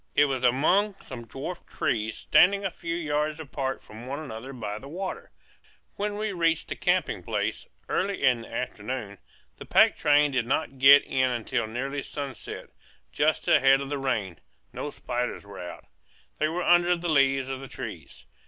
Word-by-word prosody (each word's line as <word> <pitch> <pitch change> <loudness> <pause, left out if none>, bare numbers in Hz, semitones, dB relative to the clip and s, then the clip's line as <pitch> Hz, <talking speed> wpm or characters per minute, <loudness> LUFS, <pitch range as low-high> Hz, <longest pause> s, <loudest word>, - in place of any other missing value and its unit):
It 145 - +6
was 135 -2 -2
among 175 +12 +3
some 120 -10 -10
dwarf 145 +9 -6
trees, 110 -1 -1
standing 200 +2 +4
a 190 - -1
few 165 0 -4
yards 150 -1 -1
apart 135 -3 -4
from 110 +3 -11
one 140 +2 -3
another 130 -4 -7
by 105 -5 -5
the 135 - -11
water. 185 +6 -5 0.7
When 205 0 -2
we 215 0 -2
reached 165 -3 0
the - - -3
camping - - 0
place, - - -2 0.2
early 195 0 -1
in 125 -2 +4
the 115 - -12
afternoon 110 -3 -4 0.4
the - - -9
pack - - +5
train 145 0 +4
did 125 -3 0
not 135 0 -1
get 140 +2 +9
in 130 0 +1
until 120 -1 -1
nearly 135 +5 -3
sunset, 140 -2 -7 0.4
just - - +1
ahead 135 0 +6
of 140 0 -5
the 145 -1 -2
rain 105 - -2 0.3
no 150 - -4
spiders 125 -5 -4
were 100 -1 -10
out. 90 0 -8 0.5
They 155 - +2
were 170 +3 -2
under 175 0 +5
the 175 0 -4
leaves 135 -3 +3
of 135 -1 -4
the 135 - -8
trees. - - -9
135 Hz, 175 wpm, -27 LUFS, 125-160 Hz, 0.7 s, get